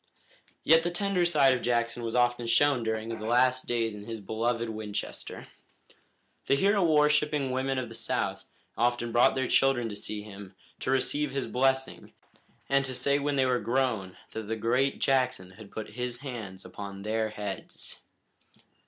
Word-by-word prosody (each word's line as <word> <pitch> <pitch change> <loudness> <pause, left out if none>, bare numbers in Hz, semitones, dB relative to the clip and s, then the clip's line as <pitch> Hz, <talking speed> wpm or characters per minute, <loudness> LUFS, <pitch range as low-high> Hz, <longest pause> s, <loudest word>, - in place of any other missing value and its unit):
Yet 160 +1 +6
the 170 - -1
tender 180 0 +1
side 140 -6 +4
of 125 - -2
Jackson 120 0 0
was 115 0 -3
often 120 -1 +2
shown 140 +1 +3
during 110 0 -2
his 115 - -5
last 125 +3 +2
days 115 -2 0
in 105 0 -9
his 115 0 -5
beloved 115 +3 -1
Winchester. 110 -2 -5 1.0
The 140 - +4
hero 200 +6 +3
worshipping 150 -3 +3
women 130 +1 -1
of 130 -2 -2
the 115 - -10
South 115 - -2 0.3
often 120 0 0
brought 120 +1 +4
their 130 -1 0
children 125 -4 +3
to 105 - -6
see 105 0 -4
him, 100 -2 -11 0.2
to - - -4
receive 145 +2 +1
his 135 0 -2
blessing, 130 +1 0 0.5
and 140 0 +3
to 130 -1 -2
say 140 +3 +2
when 145 0 -1
they 135 -1 +3
were 125 -1 +2
grown 115 -5 -1
that 110 -2 -6
the 110 - -1
great 125 +5 +1
Jackson 130 -8 +1
had 100 +1 -13
put 110 +1 -6
his 125 0 -4
hands 110 -9 -7
upon 100 -1 -8
their 110 +1 -1
heads. 105 -2 -7
120 Hz, 170 wpm, -28 LUFS, 110-135 Hz, 1.0 s, Yet